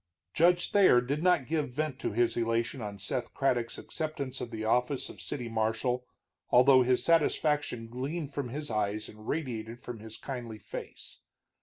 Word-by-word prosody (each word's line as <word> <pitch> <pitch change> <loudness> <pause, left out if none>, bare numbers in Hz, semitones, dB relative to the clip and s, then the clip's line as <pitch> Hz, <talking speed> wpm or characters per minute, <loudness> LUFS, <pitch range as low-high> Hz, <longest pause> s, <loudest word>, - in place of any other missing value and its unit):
Judge 175 +2 +3
Thayer 190 -11 +6
did 140 +5 -2
not 180 -6 +3
give 155 0 -1
vent 145 +1 -3
to - - -2
his 120 +3 +2
elation 115 +2 0
on 105 -2 -5
Seth 115 +5 -3
Craddock's 120 -4 +1
acceptance 155 -5 -4
of 120 - -4
the 110 -1 -4
office 125 +4 +1
of - - -9
city 125 -5 -4
marshal, 115 +3 -1 0.4
although 130 +1 +7
his 125 0 +2
satisfaction 150 -6 +2
gleamed 140 +5 -4
from 140 -4 -3
his 145 +1 -4
eyes 105 0 -1
and 110 0 -13
radiated 120 -6 -3
from 120 -2 -7
his 110 +1 -6
kindly 120 -5 -6
face. 105 - -8
125 Hz, 165 wpm, -30 LUFS, 115-145 Hz, 0.4 s, although